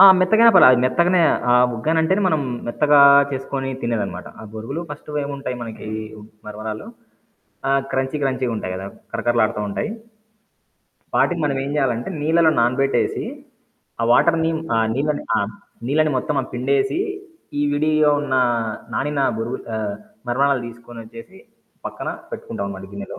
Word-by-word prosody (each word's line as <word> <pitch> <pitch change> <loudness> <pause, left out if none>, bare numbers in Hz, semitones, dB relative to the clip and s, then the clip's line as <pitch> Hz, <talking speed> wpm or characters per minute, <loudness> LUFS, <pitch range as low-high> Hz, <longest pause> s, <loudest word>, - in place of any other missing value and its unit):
ఆ! 195 - +11 0.2
మెత్తగైనా 220 +5 +6
పర్లా - - +9
అది 125 - +4
మెత్తగనే 170 +8 +3 0.3
ఆహ్, 125 0 +5
ఉగ్గనంటేనే 160 - +1
మనం 155 -3 +1 0.3
మెత్తగా 145 +4 +4 0.3
చేసుకొని 135 0 -3
తినేదన్నమాట. 115 -3 -3
ఆ - - -9
బొరుగులు 115 +8 -5
ఫస్ట్ 145 +1 -9
ఏముంటాయి 140 -3 -5
మనకి 110 -2 -8 0.3
ఉ - - -11 0.3
మరమరాలు 110 - -6 0.8
ఆహ్, 135 0 +3
క్రంచీ 135 +2 -1
క్రంచీ‌గుంటాయి 125 -8 -2
కదా! 95 +1 -6 0.3
కరకరలాడుతూ 115 -3 +1
ఉంటాయి. 100 - -3 1.3
వాటిని 175 -2 +2
మనమేం 135 -1 -1
చేయాలంటే 125 -4 0
నీళ్లలో 160 +2 +4
నానబెట్టేసి 130 +3 +1 0.8
ఆ - - +1
వాటర్‌ని 165 +5 +3 0.2
ఆ - - +2 0.2
నీళ్ళని 145 +2 -1
ఆహ్, 100 +2 -2 0.4
నీళ్ళని 155 +1 +2
మొత్తం 145 +3 -2
ఆహ్, - - -9
పిండేసి 140 - 0 0.6
ఈ - - +2
విడిగా 155 0 +3
ఉన్న 145 -2 -2 0.6
నానిన 145 0 -1 0.2
బురుగు 120 +3 -3 0.2
ఆహ్, 105 -2 -3 0.3
మరమరలు 135 +1 +2
తీసుకొనోచ్చేసి 115 -3 -12 0.5
పక్కన - - -6 0.2
పెట్టుకుంటామనమాట 100 -1 -6
గిన్నెలో. 100 0 -7
135 Hz, 125 wpm, -21 LUFS, 115-150 Hz, 1.3 s, ఆ